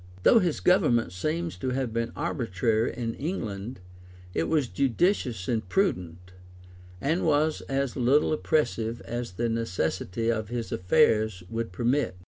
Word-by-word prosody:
Though 230 - +7
his 175 -6 0
government 135 - +3
seems 160 - -2
to 130 - -2
have 125 -3 -2
been 115 0 -1
arbitrary 115 - 0
in 115 -2 -2
England, 115 - -4 0.5
it 80 - 0
was 150 -5 +1
judicious 125 - 0
and 110 -6 -1
prudent; 90 - -1 0.7
and 160 - 0
was 155 0 +2
as 135 -2 -1
little 135 +5 +3
oppressive 120 -7 0
as 120 -4 -5
the 120 +6 -1
necessity 115 -1 -1
of 110 -2 -3
his 120 -1 -4
affairs 110 -1 +2
would 115 -2 -3
permit. 120 0 0
120 Hz, 135 wpm, -27 LUFS, 110-145 Hz, 0.7 s, Though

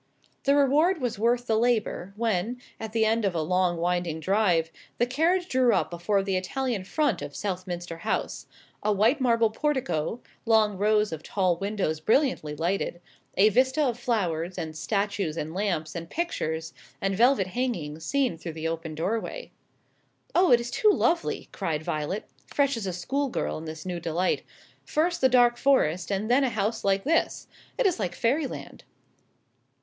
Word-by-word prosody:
The 280 0 +4
reward 300 +6 +3
was 240 -5 -2
worth 240 +2 +2
the 220 - +1
labour 220 -5 0
when, 225 +1 -1 0.2
at 220 -1 -5
the 220 0 +2
end 225 +1 +2
of 195 -3 0
a 165 - +1
long 180 +1 +1
winding 175 -1 -1
drive, 175 -2 +2 0.3
the 240 - +3
carriage 335 +8 +1
drew 255 - +3
up - - 0
before 185 +4 0
the 195 -1 -1
Italian 215 +3 -2
front 285 - 0
of 140 - -7
Southminster 180 -3 -4
House; - - -2 0.3
a 210 - +1
white 220 +8 +3
marble 230 -3 +3
portico, 255 - -1 0.2
long 220 -3 +3
rows 210 +1 +2
of 160 -1 -5
tall 185 0 +1
windows 195 -4 -2
brilliantly 215 - +1
lighted, 175 +2 -1 0.4
a 205 +3 +6
vista 260 +7 +2
of 245 -4 0
flowers, 180 -8 -1
and 160 -1 -4
statues, 195 +3 -1
and 155 +1 -4
lamps, 180 -5 -1
and 170 -1 -6
pictures, 160 - -3 0.3
and 195 0 0
velvet 235 -1 +4
hangings, 175 -10 -3
seen 260 - 0
through 165 - -6
the 160 0 -3
open 165 -1 -4
doorway. 225 - -3 0.8
"Oh, 360 0 +4
it 240 - +7
is 235 0 -5
too 430 - +3
lovely!" 345 -4 +1
cried 160 -6 -2
Violet, 155 +7 -3 0.2
fresh 280 -2 +1
as 220 -4 -4
a - - -1
schoolgirl 265 - -2
in 160 - -8
this 155 +1 -7
new 180 -2 -3
delight; 170 +2 0 0.4
"first 340 +3 0
the 260 - +5
dark 245 -1 +5
forest 205 - +2
and 200 +2 -1
then 250 +4 +4
a 265 - +2
house 220 0 -1
like 195 0 +2
this 330 +3 +1 0.3
it - - +1
is 365 - +2
like 180 -4 -2
Fairyland." 270 +4 -2
210 Hz, 170 wpm, -27 LUFS, 175-250 Hz, 0.8 s, it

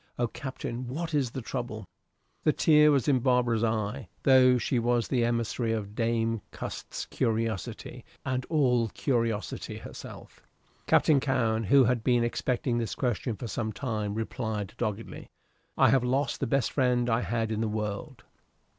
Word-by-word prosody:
O 120 - +1
Captain, 130 -1 -6
what 160 +6 -4
is 140 -4 +1
the 130 +1 -6
trouble?" 115 -4 -5 0.6
The 155 - +4
tear 150 -1 +5
was 140 -5 +2
in 135 -3 +4
Barbara's 120 -3 +2
eye, 110 0 -1
though 130 -2 +6
she 125 +1 0
was 120 0 +1
the 125 -3 +1
emissary 115 0 0
of 105 -2 -4
Dame 115 -1 0
Cust's - - -6
curiosity, 110 -4 -2 0.2
and 130 0 -1
all 125 -7 +2
curiosity 115 -3 -2
herself. - - -10 0.5
Captain 150 -3 +5
Cowen, 115 -5 0
who 135 +6 +6
had 120 -1 +1
been 120 -1 +3
expecting 120 +1 -1
this 115 -3 -3
question 120 -2 -1
for 120 - -7
some 110 0 -3
time, 110 -5 -3
replied, 110 -3 -3
doggedly, 115 -2 -4 0.5
"I - - +6
have 135 -2 +3
lost 130 +1 0
the 135 - -1
best 135 +2 +1
friend 125 -3 +2
I 115 0 +2
had 115 -2 -1
in 110 0 -1
the 115 - 0
world." 105 -1 -4
120 Hz, 155 wpm, -28 LUFS, 110-130 Hz, 0.6 s, though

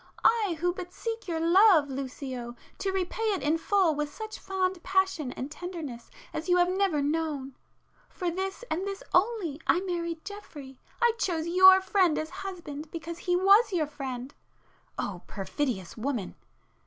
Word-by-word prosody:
—I 420 -7 +3
who 355 +1 +1
but 360 -1 -7
seek 455 +1 -5
your 330 -2 -1
love, 340 -1 +6
Lucio, 260 -2 -5 0.2
to 390 - -1
repay 380 +3 -2
it - - -5
in 315 +3 +2
full 375 -2 +3
with 295 0 -2
such 435 +5 -7
fond 375 -2 -1
passion 380 -8 +1
and 265 +3 -6
tenderness 305 -9 -7 0.2
as 320 +4 -4
you 355 - +5
have 355 0 +4
never 375 -6 +1
known! 295 -3 -1 0.6
For 355 -1 -3
this 385 +5 -4
and 365 +5 -1
this 395 -1 -5
only, 360 -6 +1
I - - +4
married 340 -3 -3
Geoffrey,—I 405 - -3
chose 335 -6 0
your 375 +2 +8
friend 375 -4 +2
as 315 +1 -3
husband 350 -6 -7
because 335 +1 -6
he 355 0 0
was 400 +5 +5
your 340 -5 +1
friend!" 265 -3 -6 0.6
(O 185 -4 -3
perfidious 195 0 -3
woman!) 230 -5 -3
340 Hz, 155 wpm, -28 LUFS, 290-380 Hz, 0.6 s, your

